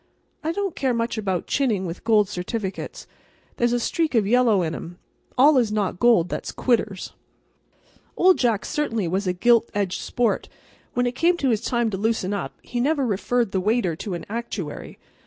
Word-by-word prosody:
I 320 Hz, -, 0 dB
don't 390 Hz, 0 st, -2 dB
care 260 Hz, -3 st, 0 dB
much 230 Hz, -1 st, -1 dB
about 190 Hz, -4 st, -1 dB
chinning 225 Hz, -9 st, 0 dB
with 170 Hz, 0 st, -6 dB
gold 215 Hz, -3 st, +4 dB
certificates. 190 Hz, +1 st, -5 dB, 0.5 s
There's 240 Hz, 0 st, +2 dB
a 245 Hz, -, +1 dB
streak 315 Hz, +4 st, 0 dB
of 220 Hz, -3 st, +3 dB
yellow 225 Hz, -3 st, +3 dB
in 160 Hz, -1 st, -2 dB
'em. 175 Hz, +2 st, -7 dB, 0.4 s
All 280 Hz, +2 st, +6 dB
is 230 Hz, -4 st, +1 dB
not 200 Hz, -4 st, -1 dB
gold 230 Hz, -8 st, +4 dB
that's -, -, -4 dB
quitters. 220 Hz, -6 st, -1 dB, 1.0 s
Old 370 Hz, 0 st, +5 dB
Jack 230 Hz, -5 st, +1 dB
certainly 230 Hz, -, -1 dB
was 190 Hz, +3 st, -1 dB
a 180 Hz, -, +1 dB
gild 235 Hz, +5 st, +4 dB
edged 200 Hz, -3 st, -1 dB
sport. 240 Hz, -2 st, -1 dB, 0.5 s
When 245 Hz, 0 st, +2 dB
it 245 Hz, -, +1 dB
came 340 Hz, +7 st, +2 dB
his 245 Hz, -9 st, +1 dB
time 235 Hz, -2 st, 0 dB
to 190 Hz, -, -2 dB
loosen 205 Hz, -2 st, 0 dB
up 200 Hz, -, -4 dB
he 245 Hz, -, -4 dB
never 280 Hz, +2 st, +1 dB
referred 230 Hz, +1 st, 0 dB
the 190 Hz, -, 0 dB
waiter 210 Hz, -4 st, +1 dB
to 190 Hz, 0 st, -4 dB
an 170 Hz, -, -7 dB
actuary. 210 Hz, -8 st, -5 dB
225 Hz, 180 wpm, -23 LUFS, 195-245 Hz, 1.0 s, All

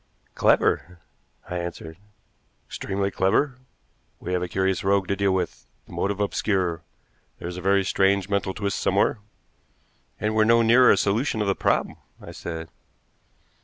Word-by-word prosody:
"Clever!" 90 Hz, 0 st, +2 dB, 0.5 s
I 90 Hz, -, -4 dB
answered. 85 Hz, -1 st, -7 dB, 0.7 s
"Extremely 100 Hz, 0 st, -3 dB
clever. 125 Hz, +9 st, +1 dB, 0.6 s
We 90 Hz, -, -4 dB
have 90 Hz, -, 0 dB
a 90 Hz, -, -2 dB
curious 95 Hz, +2 st, -1 dB
rogue 95 Hz, -1 st, +2 dB
to 100 Hz, -, +1 dB
deal 100 Hz, 0 st, +1 dB
with, 90 Hz, -3 st, -3 dB, 0.2 s
the -, -, -17 dB
motive 100 Hz, 0 st, -2 dB
obscure. 95 Hz, -5 st, 0 dB, 0.6 s
There's 85 Hz, +1 st, -6 dB
a -, -, -6 dB
very 100 Hz, +1 st, +3 dB
strange 95 Hz, 0 st, +2 dB
mental 100 Hz, -2 st, -1 dB
twist 100 Hz, -1 st, -2 dB
somewhere." 100 Hz, +3 st, +1 dB, 1.0 s
"And 105 Hz, 0 st, -1 dB
we're 110 Hz, 0 st, +4 dB
no 115 Hz, +1 st, +4 dB
nearer 120 Hz, +3 st, +6 dB
a -, -, +5 dB
solution 110 Hz, +4 st, 0 dB
of 105 Hz, -, 0 dB
the 100 Hz, -, +3 dB
problem," -, -, 0 dB, 0.2 s
I -, -, -10 dB
said. 80 Hz, -1 st, -7 dB
95 Hz, 150 wpm, -24 LUFS, 90-105 Hz, 1.0 s, nearer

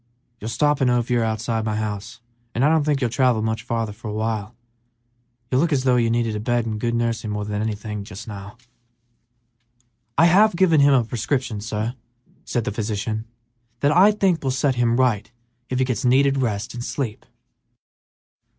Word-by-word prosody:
You 110 Hz, -, -6 dB
don't -, -, -2 dB
stop 145 Hz, +5 st, +1 dB
in 130 Hz, -, +4 dB
Ophir 120 Hz, -1 st, +1 dB
outside 110 Hz, +1 st, -1 dB
of 110 Hz, -, -3 dB
my 110 Hz, -1 st, -1 dB
house, 110 Hz, +1 st, -4 dB, 0.3 s
and 125 Hz, +4 st, +2 dB
I -, -, +5 dB
don't 160 Hz, -1 st, +3 dB
think 145 Hz, -2 st, +1 dB
you'll 125 Hz, -, +1 dB
travel 125 Hz, -4 st, +2 dB
much 110 Hz, 0 st, -1 dB
farther 115 Hz, -2 st, -2 dB
for 115 Hz, +2 st, -10 dB
a 105 Hz, -, -4 dB
while. 110 Hz, 0 st, -3 dB, 1.0 s
You 130 Hz, -, +3 dB
look 165 Hz, +2 st, +2 dB
as 135 Hz, -3 st, +1 dB
though 125 Hz, -2 st, +3 dB
you 115 Hz, -1 st, +2 dB
needed 115 Hz, -1 st, 0 dB
a -, -, -2 dB
bed 120 Hz, +1 st, 0 dB
and 110 Hz, -2 st, -3 dB
good 115 Hz, +1 st, -1 dB
nursing 115 Hz, -2 st, -1 dB
more 105 Hz, 0 st, -3 dB
than 105 Hz, 0 st, -3 dB
anything 105 Hz, -1 st, -3 dB
else 100 Hz, -, -8 dB
just 105 Hz, +5 st, -9 dB
now." 100 Hz, 0 st, -8 dB, 1.6 s
"I 165 Hz, -, +6 dB
have 200 Hz, +4 st, +5 dB
given 170 Hz, -4 st, +4 dB
him 140 Hz, -1 st, +6 dB
a 125 Hz, -, +4 dB
prescription, 120 Hz, -1 st, -2 dB
sir," 110 Hz, +2 st, -3 dB, 0.5 s
said 120 Hz, -, -1 dB
the -, -, -2 dB
physician, 110 Hz, +1 st, -3 dB, 0.6 s
"that 145 Hz, -, +3 dB
I 195 Hz, +4 st, +7 dB
think 195 Hz, -6 st, +1 dB
will 135 Hz, -, 0 dB
set 135 Hz, +1 st, +1 dB
him 120 Hz, -1 st, +1 dB
right 115 Hz, -4 st, +1 dB, 0.4 s
if 130 Hz, -, -1 dB
he 130 Hz, -, +2 dB
gets 125 Hz, -5 st, -2 dB
needed 135 Hz, +2 st, +3 dB
rest 115 Hz, -2 st, -2 dB
and 120 Hz, 0 st, -5 dB
sleep." 125 Hz, -5 st, -4 dB
115 Hz, 195 wpm, -22 LUFS, 110-130 Hz, 1.6 s, I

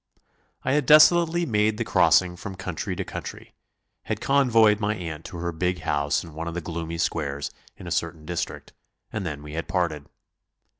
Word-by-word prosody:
I -, -, 0 dB
had 150 Hz, -3 st, +1 dB
desolately 170 Hz, +2 st, +6 dB
made 105 Hz, -4 st, +1 dB
the 115 Hz, -, -1 dB
crossing 90 Hz, -2 st, +3 dB
from 95 Hz, +2 st, -7 dB
country 90 Hz, -3 st, -4 dB
to -, -, -3 dB
country, -, -, -8 dB, 0.5 s
had 110 Hz, -, -2 dB
convoyed 115 Hz, -6 st, +4 dB
my 105 Hz, 0 st, 0 dB
aunt 80 Hz, -4 st, -6 dB
to 85 Hz, -, -7 dB
her 85 Hz, +1 st, -2 dB
big 90 Hz, +1 st, -1 dB
house 75 Hz, -1 st, 0 dB
in 85 Hz, -3 st, -11 dB
one 80 Hz, +2 st, -5 dB
of 85 Hz, -, -5 dB
the -, -, -1 dB
gloomy 85 Hz, 0 st, -5 dB
squares 70 Hz, -4 st, -2 dB, 0.3 s
in -, -, -11 dB
a -, -, -6 dB
certain 75 Hz, -1 st, -2 dB
district, 85 Hz, 0 st, -4 dB, 0.4 s
and 105 Hz, -5 st, -3 dB
then 75 Hz, -2 st, -5 dB
we 75 Hz, 0 st, -9 dB
had 85 Hz, +2 st, -4 dB
parted. 85 Hz, -6 st, -1 dB
90 Hz, 185 wpm, -25 LUFS, 80-110 Hz, 0.5 s, desolately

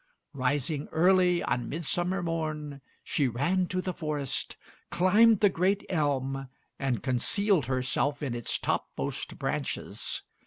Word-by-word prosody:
Rising 140 Hz, +2 st, -1 dB
early 180 Hz, +1 st, +4 dB
on 125 Hz, -, -1 dB
Midsummer 175 Hz, +4 st, 0 dB
Morn, 155 Hz, -4 st, -3 dB, 0.2 s
she 140 Hz, -, +1 dB
ran 170 Hz, +10 st, +1 dB
to 185 Hz, +1 st, -2 dB
the 185 Hz, -, -2 dB
forest, 145 Hz, -4 st, -3 dB, 0.3 s
climbed 205 Hz, +5 st, +5 dB
the 205 Hz, -, +7 dB
great 190 Hz, +3 st, +1 dB
elm, 135 Hz, -5 st, -1 dB, 0.3 s
and 130 Hz, -6 st, -1 dB
concealed 175 Hz, -, +1 dB
herself 130 Hz, +3 st, 0 dB
in 135 Hz, -4 st, -2 dB
its 120 Hz, -1 st, -1 dB
topmost -, -, -3 dB
branches. -, -, -3 dB
150 Hz, 120 wpm, -29 LUFS, 135-180 Hz, 0.3 s, the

